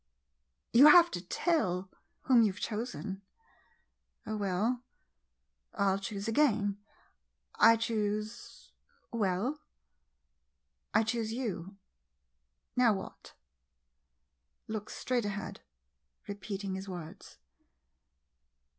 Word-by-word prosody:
You 270 +6 +9
have 340 +2 +8
to - - -4
tell 190 - 0 0.3
whom 250 -3 +5
you 215 -3 +4
've 190 - -12
chosen? 215 -3 -4 1.0
Oh, 215 - -3
well 210 +5 0 0.5
— - - -52
I - - 0
'11 195 +1 0
choose 200 +1 -5
again. 220 -5 +2 0.7
I 230 - +7
choose 215 0 -3 0.2
— 475 - -34
well 220 +6 0 0.6
— 60 0 -51
I - - +5
choose 225 -1 -2
you. 200 -6 -4 1.0
Now 245 -3 +5
what? 190 -1 -8 1.3
[Looks 215 -1 -5
straight 245 -3 -1
ahead, 200 -1 -5 0.7
repeating 200 -1 -5
his 190 +1 -6
words. 175 -4 -9
205 Hz, 100 wpm, -31 LUFS, 190-230 Hz, 1.3 s, You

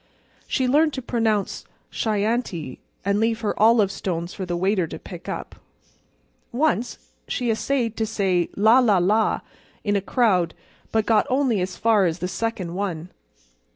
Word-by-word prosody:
She 260 -2 0
learned 300 +3 +3
to 260 - -4
pronounce 225 -4 0 0.3
Chianti, 210 - -1 0.3
and 200 +1 +2
leave 225 +1 +1
her 215 - 0
olive 215 -2 +5
stones 175 -2 -4
for 190 -2 -5
the 175 0 -2
waiter 190 -1 +1
to - - -7
pick - - -10
up. - - -6 0.9
Once 250 -2 -1 0.2
she 245 -3 -1
essayed 235 0 -1
to 220 - 0
say 190 -5 0
la, 220 +5 +6
la, 220 -6 +4
la! 210 +5 +2 0.4
in 205 -1 +1
a 200 - +1
crowd 190 -7 +1 0.4
but 220 -1 +1
got 225 -2 +3
only 255 -6 +1
as 185 0 -3
far 220 -4 +3
as 165 0 -2
the 180 - -3
second 190 -4 -3
one. 180 -3 -3
215 Hz, 155 wpm, -23 LUFS, 185-230 Hz, 0.9 s, la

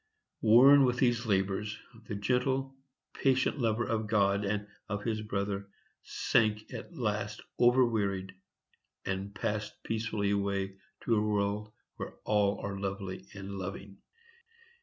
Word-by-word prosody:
Worn 130 +6 +8
with 125 -1 +2
these 120 -2 +2
labors, 100 +1 0 0.3
the 105 - -3
gentle, 130 +5 0 0.4
patient 135 +2 +2
lover 115 -1 +1
of 110 -1 -1
God 100 -2 +2
and 105 +1 -1 0.2
of 105 -1 -3
his 110 -2 -1
brother, 100 -1 -3 0.3
sank 110 -1 +1
at 175 - -8
last 105 -3 -2 0.2
overwearied, 110 -6 +3 0.7
and 95 +1 -3
passed 105 +1 -2
peacefully 110 -2 -1
away 100 -1 -1 0.2
to 115 - +2
a 105 - +3
world 105 0 0 0.3
where - - -6
all 105 -1 +2
are 100 -1 -4
lovely 95 -7 -4
and 100 0 -6
loving. 95 +1 -7
105 Hz, 125 wpm, -31 LUFS, 100-115 Hz, 0.7 s, Worn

